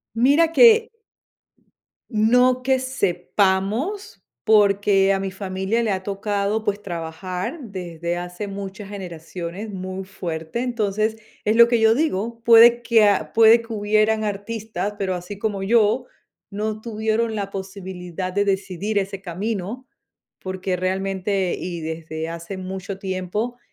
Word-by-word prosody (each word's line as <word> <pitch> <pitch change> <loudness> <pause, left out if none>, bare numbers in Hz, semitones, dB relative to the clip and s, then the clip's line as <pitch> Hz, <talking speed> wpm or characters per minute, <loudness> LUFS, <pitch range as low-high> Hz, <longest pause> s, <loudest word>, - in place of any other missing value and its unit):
Mira 285 +8 +4
que 455 +3 +6 1.2
no 250 +3 +3
que 260 0 +2
sepamos, 205 - -1 0.2
porque 200 -2 +4
a 195 - 0
mi 195 - -3
familia 190 +3 -2
le 225 - 0
ha 190 -1 -1
tocado, 200 +2 -1
pues, 205 -1 -1
trabajar 180 - -5
desde 175 - -5
hace 180 +3 -5
muchas 195 0 -7
generaciones 180 0 -7
muy 185 0 -5
fuerte. 170 0 -5
Entonces, 215 -3 -1 0.3
es 215 - +2
lo 235 0 +8
que 235 -1 +2
yo 220 0 +5
digo, 235 -5 -1
puede 235 +1 +8
que 230 -2 +4
a 190 -7 +1
puede 225 +1 +7
que 230 0 -7
hubieran 215 +1 +2
artistas, 205 -1 -4
pero 190 -2 -1
así 180 +3 -7
como 200 -2 -2
yo, 230 +3 +3 0.4
no 215 +1 -3
tuvieron 220 0 -1
la 200 -1 -3
posibilidad 190 -2 -6
de 205 +2 +1
decidir 195 +1 -2
ese 195 0 -3
camino, 200 +6 -4 0.5
porque 185 0 -3
realmente 190 0 -1
y 175 -2 -5
desde 160 0 -5
hace 170 +3 -6
mucho 190 +1 -6
tiempo, 195 +6 -3
200 Hz, 130 wpm, -22 LUFS, 185-220 Hz, 1.2 s, lo